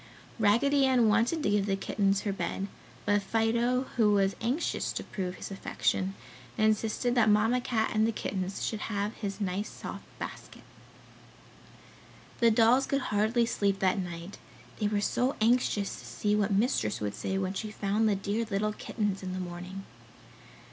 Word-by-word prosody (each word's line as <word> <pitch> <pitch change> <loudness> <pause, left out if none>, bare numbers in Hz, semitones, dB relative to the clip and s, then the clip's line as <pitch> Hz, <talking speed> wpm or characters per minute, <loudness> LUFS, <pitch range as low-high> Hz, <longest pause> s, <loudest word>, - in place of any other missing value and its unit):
Raggedy 265 +7 +4
Ann 245 -4 +4
wanted 230 +9 +2
to - - +2
give 205 -1 +2
the 195 - +1
kittens 195 0 0
her 205 -3 -2
bed, 195 0 -3 0.4
but 205 0 +3
Fido, 230 +4 +1
who 215 -3 +4
was 195 -1 +2
anxious 250 +9 -1
to - - -4
prove 185 -2 -4
his - - -8
affection, 95 - -1 0.4
insisted 220 +2 +1
that 235 -3 +4
Mamma 220 +4 +3
Cat 220 -3 0
and 215 0 +3
the - - +1
kittens 190 -3 -3
should 220 - -2
have 205 0 -2
his 200 -3 -5
nice 200 +1 -2
soft - - -8
basket. - - -8 1.8
The 235 - +6
dolls 230 +4 +4
could 275 -4 -1
hardly 220 +3 +3
sleep 200 -3 0
that 190 0 +1
night; 175 +1 -6 0.4
they 210 - +1
were 205 -1 0
so 250 +5 +1
anxious 220 -3 +1
to - - -12
see 210 0 0
what 210 0 +1
Mistress 200 - +1
would 105 -1 -2
say 190 - -2
when 190 0 -1
she 215 +2 -4
found 210 +1 +1
the 205 - +2
dear 200 +4 -1
little 210 +1 0
kittens 205 -3 -2
in 185 -1 -4
the 185 - -3
morning. 180 +2 -6
210 Hz, 170 wpm, -29 LUFS, 195-230 Hz, 1.8 s, The